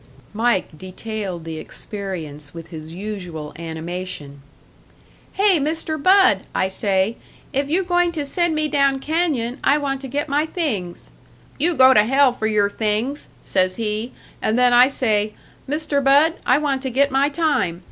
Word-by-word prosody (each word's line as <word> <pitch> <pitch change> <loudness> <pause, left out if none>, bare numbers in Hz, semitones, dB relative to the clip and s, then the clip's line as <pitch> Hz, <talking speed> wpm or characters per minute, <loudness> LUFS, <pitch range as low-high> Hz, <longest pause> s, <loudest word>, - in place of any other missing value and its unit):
Mike 220 -6 0
detailed 185 0 -6
the 160 -1 -5
experience 160 -8 -6
with 165 -1 -9
his 160 -2 -8
usual 180 -5 -6
animation. 165 -3 -6 0.9
"'Hey, 390 -4 +3
Mister 315 +2 -2
Bud,' 365 - +4
I 190 - +1
say, 195 +3 0 0.4
'if 275 +1 -1
you 360 +5 +1
going 350 -1 +2
to 300 -3 -3
send 345 +3 0
me 305 0 0
down 275 -2 +2
canyon, 285 -5 -1
I 285 - +4
want 275 -2 -2
to 270 - -6
get 285 +4 -2
my 295 +2 +1
things.' 220 - -3 0.5
'You 335 +4 +1
go 260 -1 +7
to 210 - +6
hell 270 +2 +3
for 220 -2 -2
your 210 -2 +2
things,' 220 +7 -2
says 185 -1 +1
he. 220 +2 -3 0.3
And 220 +2 +1
then 250 -1 +4
I 245 +1 +7
say, 215 -6 0 0.3
'Mister 295 0 -1
Bud, 285 +4 +5
I 255 - +5
want 285 -3 -1
to 265 - -3
get 275 +3 +2
my 275 +2 +2
time.' 285 - 0
245 Hz, 160 wpm, -21 LUFS, 190-290 Hz, 0.9 s, go